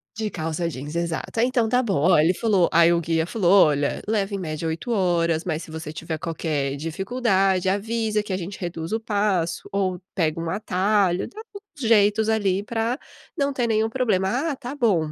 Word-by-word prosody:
De 215 -1 -3
calça 160 0 -2
jeans, 145 +1 -6
exato. 170 +5 -3
Ah, - - +4
então 245 -3 +1
tá 250 +2 +2
bom, 205 -5 0
ó, 180 - +6
ele 160 +4 +4
falou 195 -3 +2
aí 170 0 +6
o 170 - +3
guia 165 -1 0
falou: 195 -1 +5
"Olha, 145 -2 0
leva 205 -2 0
em 195 - -2
média 155 -2 -4
8 160 +9 -3
horas, 170 -5 +1
mas 160 -3 -2
se 165 - -10
você 160 -1 -6
tiver 160 0 -4
qualquer 150 -4 -2
dificuldade 190 - 0
avisa 215 +1 -1
que 205 - -4
a - - 0
gente 190 +2 -7
reduz 165 -2 -5
o 225 - 0
passo 205 -6 -1
ou 190 -2 -1
pega 165 -3 0
um 165 - -3
atalho", 195 -1 +1
dá 425 - -12 0.2
uns 350 - -7
jeitos 215 0 +4
ali 200 -3 +1
pra 230 +3 -1 0.4
não 280 -1 0
ter 245 -3 0
nenhum 220 0 +1
problema, 235 - 0
"Ah, - - -3
tá 265 +1 -7
bom". 190 - +1
190 Hz, 200 wpm, -23 LUFS, 165-220 Hz, 0.4 s, ó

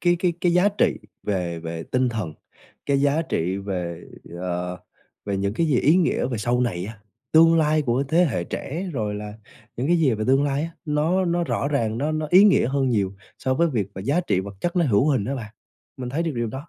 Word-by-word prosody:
cái 175 -1 +3
cái 175 -1 +1
cái 175 -1 +2
giá 185 +3 +5
trị 205 - +1 0.2
về 90 -4 -2
về 80 0 -5
tinh 125 0 0
thần, 105 -10 -4 0.5
cái 140 -1 +2
giá 145 +3 +2
trị 95 - -1
về, 90 -4 -4 0.3
ờ, 90 0 -3 0.5
về 100 -1 -2
những 100 +2 -1
cái 165 - +1
gì 140 -5 +2
ý 155 +6 +4
nghĩa 175 -7 +1
về 120 -4 -3
sau 120 +3 0
này 90 -8 -1
á, 110 +1 -8 0.3
tương 165 +1 +6
lai 155 -1 +2
của 125 +1 +1
thế 170 +4 +4
hệ 115 - -1
trẻ, 175 - -5
rồi 105 -5 -2
là 105 0 -6 0.4
những 125 - -1
cái 175 +2 +3
gì 135 -7 +3
về 110 0 -3
tương 135 +2 +4
lai 140 +1 0
á, 165 - -4
nó 160 +5 +1
nó 170 0 0
rõ 140 - -1
ràng 115 -6 0
nó 150 +2 -1
nó 155 0 -2
ý 190 +3 +8
nghĩa 190 - +4
hơn 135 -1 +1
nhiều 100 -5 0 0.2
so 130 -1 0
với 170 +3 +2
việc 110 -7 -1
mà 95 - -6
giá 140 - +1
trị 95 - 0
vật 100 +1 -8
chất 175 +1 -2
nó 170 - +4
hữu 120 +3 +3
hình 125 -8 +1
á 135 +5 -2
bạn, 110 -4 -7 0.4
mình 125 -2 -5
thấy 155 +5 -1
được 165 -3 -2
điều 120 -1 -1
đó. 135 +8 -7
130 Hz, 240 wpm, -23 LUFS, 105-160 Hz, 0.5 s, ý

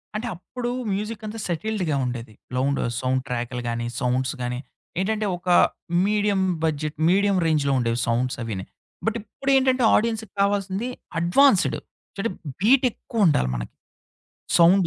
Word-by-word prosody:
అంటే, 220 +3 -2
అప్పుడు 240 +8 -5 0.2
మ్యూజిక్ 210 +2 -3
అంతా 215 +1 -5
సెటిల్డ్‌గా 180 -2 -1
ఉండేది. 120 -3 -5 0.2
లౌండ్ 135 +2 +1 0.2
సౌండ్ 130 0 0
ట్రాకులు 120 0 -3
గాని, 120 0 -2
సౌండ్స్ 130 0 0
గాని, 125 0 -2 0.4
ఏంటంటే 215 +2 0
ఒక 180 +1 -6 0.6
మీడియం 205 -1 +2 0.2
బడ్జెట్, 155 -1 -1
మీడియం 200 +1 +3
రేంజ్‌లో 150 -4 +2
ఉండేవి 115 0 0
సౌండ్స్ 120 +2 0
అవినాయి. 100 -4 -5 0.4
బట్ 225 +1 +1
ఇప్పుడేంటంటే, 260 +3 +2
ఆడియన్స్‌కి 220 -2 0
కావాల్సింది, 200 +3 0 0.3
అడ్వాన్స్‌డ్. 190 +6 +4 0.4
చంటే 200 +2 -1 0.3
బీట్ 255 +6 +5
ఎక్కువుండాలి 180 - +1
మనకి. - - -5 0.9
సౌండ్ 175 +2 +6
185 Hz, 125 wpm, -24 LUFS, 130-215 Hz, 0.9 s, సౌండ్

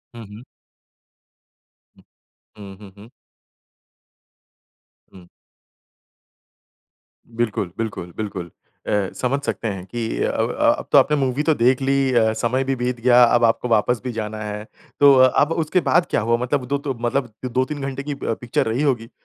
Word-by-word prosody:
हुँ, 115 -2 -9
हुँ। 105 +4 -12 2.1
हुँ, 100 -2 -10
हुँ, 100 -2 -13
हुँ। 105 +3 -14 2.0
हुँ। 90 -2 -15 2.0
बिल्कुल, 115 -6 -2
बिल्कुल, 105 -6 -5
बिल्कुल। 95 -5 -5 0.4
अ, - - -2 0.2
समझ 135 +2 -1
सकते 115 - -3
हैं 95 -3 -5
कि 115 +1 -4
अ - - 0
अ, - - +1
अब - - -8
तो - - +6
आपने 150 0 +4
मूवी 135 +1 0
तो 160 - +3
देख 125 +3 +2
ली, 135 0 +1
अ, 110 -2 +3
समय 120 +4 -1
भी 135 0 -1
बीत 125 0 -3
गया, 125 0 +5
अब 120 0 +3
आपको 115 +2 +2
वापस 115 +1 +1
भी 125 - -3
जाना 110 -1 -5
है। 105 0 -5 0.4
तो 140 -1 +7
अब 145 +4 +3
उसके 180 +4 +1
बाद 175 0 +4
क्या - - +1
हुआ 115 +2 +1
मतलब 125 0 -1
दो 140 +1 0
तो 140 -1 -4
मतलब 120 0 -1
2-3 130 +4 -2
घंटे 135 0 -4
की 145 0 -4
अ, 115 - +1
पिक्चर 120 +1 -2
रही 120 +6 -1
होगी। 120 -5 0
120 Hz, 160 wpm, -21 LUFS, 110-135 Hz, 2.1 s, तो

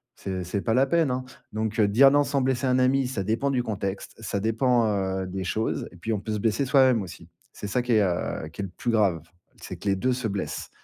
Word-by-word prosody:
c'est 95 -2 -4
c'est 100 +3 -2
pas 110 - 0
la 130 +3 +4
peine, 160 -2 +2
hein. 130 0 -2 0.3
Donc, 110 0 -2
heu, 105 - +5
dire 135 +7 +7
non 145 +1 +4
sans 140 0 0
blesser 130 0 0
un 130 0 +3
ami, 130 0 +3
ça 110 -7 -3
dépend 115 +7 0
du 125 -2 0
contexte, 100 -4 -4
ça 100 -2 -2
dépend, 115 +2 +2
heu, 95 -2 -1
des 95 +1 -4
choses, 110 +5 -2
et 90 - -15
puis, 110 +6 -3
on 105 - -1
peut 110 - -5
se 105 - -1
blesser 115 +6 +1
soi-même 130 -3 +4
aussi. 90 -3 -9 0.2
C'est 105 - -7
ça 125 +5 0
qui 120 -1 0
est, 110 - +5
heu, 90 -4 -1
qui 90 - -7
est - - -2
le 95 - -5
plus 120 - -1
grave, 100 -8 +2 0.4
c'est - - -7
que 100 - -3
les 95 - +3
2 125 +6 +1
se 125 -2 -2
blessent. 100 -1 -4
110 Hz, 260 wpm, -26 LUFS, 100-130 Hz, 0.4 s, dire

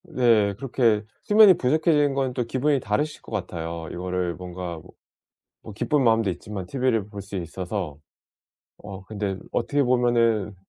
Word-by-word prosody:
네 110 -5 +4
그렇게 115 -2 +1 0.2
수면이 210 -3 +7
부족해지는 150 +1 +2
건 135 -2 -1
또 125 -2 -2
기분이 135 +3 +1
다르실 135 +9 -2
것 - - -12
같아요. 85 -4 -4
이거를 90 -1 -2
뭔가 90 -1 -6
뭐 - - -17 0.7
뭐 110 - -10
기쁜 145 +6 +1
마음도 110 -3 +3
있지만 95 +1 -6
티브이를 125 -6 0
볼 100 -2 -7
수 100 0 -9
있어서. 90 -2 -4 0.8
어 100 -2 -9
근데 100 -2 -3 0.2
어떻게 145 +4 +1
보면은 120 -5 +2
110 Hz, 320 characters per minute, -24 LUFS, 95-130 Hz, 0.8 s, 수면이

